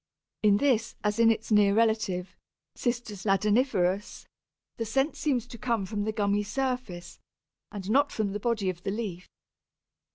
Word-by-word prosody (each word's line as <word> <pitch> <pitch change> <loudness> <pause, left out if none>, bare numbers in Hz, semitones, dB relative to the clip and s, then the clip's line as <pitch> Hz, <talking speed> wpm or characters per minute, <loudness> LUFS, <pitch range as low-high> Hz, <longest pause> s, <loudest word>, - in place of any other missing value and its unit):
In 205 -2 +5
this, 235 -3 +1
as 210 +1 0
in 230 -1 +6
its 225 0 -1
near 205 -1 +5
relative, 220 -5 +1 0.4
C. 245 - -1
ladaniferus, 210 -2 0 0.5
the 230 - -1
scent 270 +7 0
seems 255 -6 0
to 240 -2 -11
come 230 -5 0
from 205 +1 -3
the 220 - 0
gummy 205 -1 +1
surface, 210 -6 -4 0.5
and 195 -3 -7
not 280 +6 +3
from 210 -3 -1
the 205 - -3
body 220 -3 -1
of 175 -1 -13
the 195 - -3
leaf. 195 -4 -4
215 Hz, 155 wpm, -28 LUFS, 200-235 Hz, 0.5 s, in